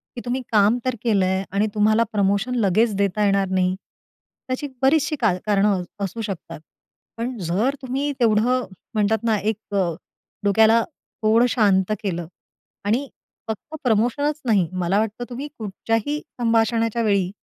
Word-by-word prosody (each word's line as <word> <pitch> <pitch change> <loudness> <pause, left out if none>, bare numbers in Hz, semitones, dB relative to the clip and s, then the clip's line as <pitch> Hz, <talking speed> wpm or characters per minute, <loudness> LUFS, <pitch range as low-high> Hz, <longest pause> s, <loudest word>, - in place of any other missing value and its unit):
की 240 - -5
तुम्ही 250 +2 -1
काम 210 +2 +4
तर 255 -1 0
केल 215 -5 +2
आहे 190 +1 0
आणि 200 +2 +1
तुम्हाला 215 +2 +3
प्रमोशन 205 +4 +1
लगेच 215 +2 +2
देता 200 +1 +1
येणार 195 -1 +2
नाही 185 -1 +1 0.7
त्याची 255 +3 -2
बरीचशी 300 +3 +3
कार 210 -7 +2
कारणं 200 -2 +2 0.2
असू 210 +5 -5
शकतात. 190 -6 -6 0.6
पण 240 +2 -3
जर 200 - 0
तुम्ही 270 +3 -2
तेवढं 240 +2 +2 0.3
म्हणतात 215 0 +1
ना, 225 -2 +2
एक 210 0 -3 0.7
डोक्याला 220 +3 +5 0.4
थोडं 225 +2 +4
शांत 200 -4 +2
केलं 175 -4 -3 0.6
आणि 240 +7 +1 0.4
फक्त 225 +8 -6
प्रमोशनच 250 +6 +1
नाही, 205 -7 +3
मला 185 +2 +1
वाटतं 220 +2 -2
तुम्ही 255 +4 -5
कुठच्याही 225 +7 -2 0.2
संभाषणाच्या 230 0 +2
वेळी 200 -4 +1
220 Hz, 135 wpm, -22 LUFS, 200-240 Hz, 0.7 s, डोक्याला